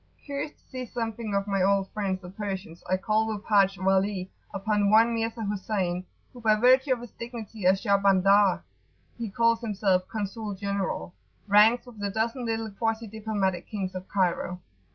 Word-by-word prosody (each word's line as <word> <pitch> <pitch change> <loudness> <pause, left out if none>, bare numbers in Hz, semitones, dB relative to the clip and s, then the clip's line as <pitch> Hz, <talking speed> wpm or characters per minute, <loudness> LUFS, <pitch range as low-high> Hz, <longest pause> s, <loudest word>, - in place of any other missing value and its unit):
Curious 285 +1 -4
to - - -35
see 255 -2 -5
something 225 -2 -3
of 200 0 +1
my 195 -2 0
old 195 0 +3
friends 195 -3 -2
the 180 - -8
Persians, 190 -4 -6
I 185 - +3
called 215 +3 +1
with 205 - -10
Haji 195 -3 +3
Wali 190 0 +1 0.2
upon 205 +1 +1
one 225 +2 +5
Mirza 225 0 -2
Husayn, 190 -3 -2 0.3
who 245 - -11
by 215 -1 +4
virtue 260 +5 +4
of 245 - -5
his 240 - -9
dignity 225 -4 -5
as 190 +1 +3
"Shahbandar[FN#25]" 195 0 +4 0.6
(he 230 -2 -3
calls 230 +3 +2
himself 195 -4 +1
"Consul 210 +1 -4
General"), 195 - -3 0.3
ranks 215 +5 +5
with 240 -4 -13
the 205 0 -1
dozen 230 +4 -2
little 225 -1 -2
quasi 225 +2 -1
diplomatic 210 -4 -2
kings 195 -3 -4
of 185 0 -7
Cairo. 180 -1 0
205 Hz, 170 wpm, -27 LUFS, 195-225 Hz, 0.6 s, one